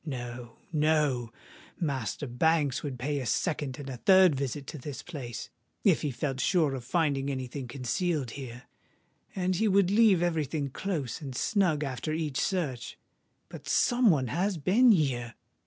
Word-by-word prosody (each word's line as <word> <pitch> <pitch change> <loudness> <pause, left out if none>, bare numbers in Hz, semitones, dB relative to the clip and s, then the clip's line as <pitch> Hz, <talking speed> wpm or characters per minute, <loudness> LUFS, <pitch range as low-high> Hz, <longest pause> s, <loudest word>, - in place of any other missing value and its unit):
No—no: 130 +1 -1 0.5
Master 140 -4 -2
Banks 145 +2 +1
would 140 -4 -5
pay 140 +3 -2
a 130 - -4
second 145 -5 -1
and 145 - -8
a 130 -2 -5
third 185 +3 +6
visit 140 +1 -3
to 150 - -7
this 140 +1 -7
place, 135 -9 -7 0.3
if - - +4
he 150 - -1
felt 135 0 -3
sure 160 -3 +2
of 130 -2 -5
finding 140 -1 0
any 130 -2 -3
thing 125 +1 -6
concealed 140 - -2
here; 125 -2 -8 0.7
and 185 -1 0
he 220 +3 +2
would 195 -2 +3
leave 205 -5 +5
every 165 -3 +1
thing 140 0 -3
close 155 - -3
and 135 -4 -6
snug 170 - +1
after 135 +3 -3
each 155 -4 -2
search. 145 -11 -2 0.5
But - - -10
some 245 -2 +4
one 135 - +2
has 185 - 0
been 210 - +5
here! 125 - +1
145 Hz, 160 wpm, -29 LUFS, 130-175 Hz, 0.7 s, third